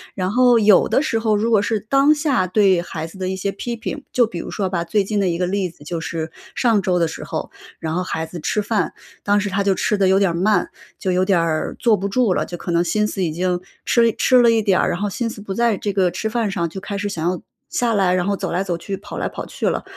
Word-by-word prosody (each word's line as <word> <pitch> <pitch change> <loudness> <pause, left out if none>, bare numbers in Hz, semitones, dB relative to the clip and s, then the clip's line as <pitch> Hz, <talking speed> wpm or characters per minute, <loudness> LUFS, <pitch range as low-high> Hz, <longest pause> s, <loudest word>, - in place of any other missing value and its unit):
然 185 0 -1
后 245 0 +5
有 210 -3 +5
的 - - +3
时 230 -7 0
候， 220 -1 +1
如 225 +3 0
果 210 -3 +5
是 215 0 0
当 275 +8 +3
下 275 - +1
对 190 -2 +3
孩 160 -2 -5
子 165 +4 -11
的 185 0 -2
一 190 - -2
些 195 +1 -2
批 235 +4 -5
评， 275 +5 -6
就 245 - +4
比 180 -6 -6
如 - - -6
说 195 -2 -2
吧， 175 -2 -1
最 205 +3 +1
近 205 +1 -1
的 195 - +1
一 170 -1 0
个 180 - 0
例 190 0 -1
子 160 -3 -17
就 165 +2 -4
是 160 -1 -4 0.2
上 225 -5 +3
周 180 -2 +1
的 170 -2 +2
时 - - -7
候， - - -5 0.3
然 160 0 -4
后 180 - 0
孩 160 -3 -3
子 170 +1 -8
吃 210 +7 -1
饭， 205 -4 0 0.3
当 205 0 +2
时 205 - -2
他 200 +1 0
就 195 -1 +2
吃 210 - 0
得 195 -2 +2
有 190 +1 +4
点 195 -3 +3
儿 - - -4
慢， 200 +5 +2 0.3
就 185 - -2
有 180 +1 +2
点 185 -3 +3
儿 160 -2 -1
坐 230 -4 +3
不 200 0 -3
住 230 -3 +2
了， - - 0
就 175 - -6
可 175 - -5
能 170 +1 +3
心 210 +4 +1
思 195 -3 -2
已 165 - 0
经 180 +2 -1 0.2
吃 230 -1 +4
吃 255 +2 +4
了 235 - +5
一 225 -1 +3
点 195 -3 +3
儿， - - +2
然 175 - -2
后 205 - 0
心 230 +3 -2
思 215 - -9
不 200 -1 -5
在 230 -1 +1
这 205 -2 -3
个 185 -2 +2
吃 190 +5 -3
饭 230 -3 0
上 170 -3 -1
就 190 +4 -8
开 200 - -5
始 205 +1 -2
想 170 -3 -1
要 180 - -2 0.3
下 240 -2 0
来， 185 -3 +2
然 180 - 0
后 200 0 +1
走 190 -3 -4
来 180 +3 0
走 180 -3 -2
去， 195 +3 -5
跑 - - -8
来 - - -1
跑 - - -7
去 - - -2
了。 - - -2
195 Hz, 315 characters per minute, -20 LUFS, 180-215 Hz, 0.3 s, 后